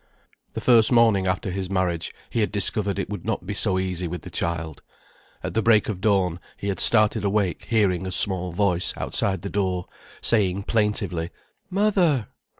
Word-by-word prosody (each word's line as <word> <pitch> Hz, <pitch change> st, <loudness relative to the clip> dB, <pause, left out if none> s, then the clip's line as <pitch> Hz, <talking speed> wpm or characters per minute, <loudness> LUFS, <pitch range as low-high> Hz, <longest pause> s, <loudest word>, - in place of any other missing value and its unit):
The -, -, -3 dB
first 115 Hz, -2 st, +5 dB
morning 110 Hz, -6 st, +4 dB
after 95 Hz, +1 st, -2 dB
his 95 Hz, 0 st, -4 dB
marriage 90 Hz, -3 st, -1 dB, 0.2 s
he -, -, -1 dB
had 105 Hz, -, 0 dB
discovered 100 Hz, -1 st, -1 dB
it 100 Hz, -, -2 dB
would 105 Hz, -5 st, -5 dB
not 105 Hz, -5 st, -3 dB
be 100 Hz, -, -4 dB
so 100 Hz, -2 st, +2 dB
easy 90 Hz, -1 st, -2 dB
with 90 Hz, 0 st, -6 dB
the -, -, -10 dB
child. 80 Hz, -3 st, -3 dB, 0.6 s
At -, -, -4 dB
the 110 Hz, -, +1 dB
break 110 Hz, -1 st, +3 dB
of 95 Hz, -4 st, -4 dB
dawn 95 Hz, -5 st, +1 dB, 0.2 s
he 100 Hz, -, -4 dB
had 95 Hz, -, -3 dB
started 110 Hz, -1 st, +4 dB
awake 100 Hz, -4 st, -1 dB
hearing 95 Hz, -5 st, +1 dB
a -, -, -4 dB
small 95 Hz, -5 st, +3 dB
voice 90 Hz, -1 st, +1 dB
outside 95 Hz, -3 st, -1 dB
the 100 Hz, -, -4 dB
door 95 Hz, -3 st, -1 dB, 0.3 s
saying 100 Hz, -4 st, +1 dB
plaintively: 100 Hz, -6 st, 0 dB, 0.4 s
"Mother!" 180 Hz, -, +1 dB
100 Hz, 175 wpm, -23 LUFS, 90-110 Hz, 0.6 s, first